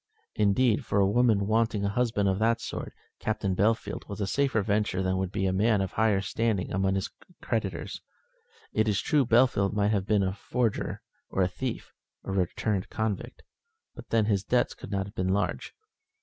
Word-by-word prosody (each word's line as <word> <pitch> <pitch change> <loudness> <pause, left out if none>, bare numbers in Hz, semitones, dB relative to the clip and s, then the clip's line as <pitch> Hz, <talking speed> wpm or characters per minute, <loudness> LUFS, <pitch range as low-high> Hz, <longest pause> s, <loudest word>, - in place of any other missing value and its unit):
Indeed, 105 +2 +2
for 100 - 0
a 100 - +5
woman 105 -1 +3
wanting 110 -1 +1
a - - +1
husband 110 -2 +1
of 95 0 +1
that 115 +1 +2
sort, - - -5 0.3
Captain 105 -3 -1
Bellfield 110 +4 0
was 100 - -6
a 100 - 0
safer 130 0 +1
venture 105 -2 0
than 95 0 0
would 95 -1 -2
be 95 - -1
a 95 - +1
man 105 +2 +3
of 95 -2 -1
a - - -19
higher 110 -3 +3
standing 100 -1 -1
among 95 +1 +1
his 95 - -2 0.3
creditors. - - -3 0.7
It 110 - +2
is 100 -2 +2
true 145 -5 +2
Bellfield 115 -5 +3
might 105 0 +2
have 100 -2 0
been 105 -2 +3
a 95 0 0
forger, 115 +2 -2 0.3
or 95 - +1
a - - +3
thief, 125 +6 -5 0.3
or 95 - -4
a - - -1
returned 95 +2 -1
convict, 110 -3 -3 0.5
but - - -12
then 115 -2 +3
his 100 -3 +1
debts 125 +2 +1
could - - -10
not 100 0 -3
be 95 - -3
large. 95 +3 -1
105 Hz, 190 wpm, -28 LUFS, 95-110 Hz, 0.7 s, a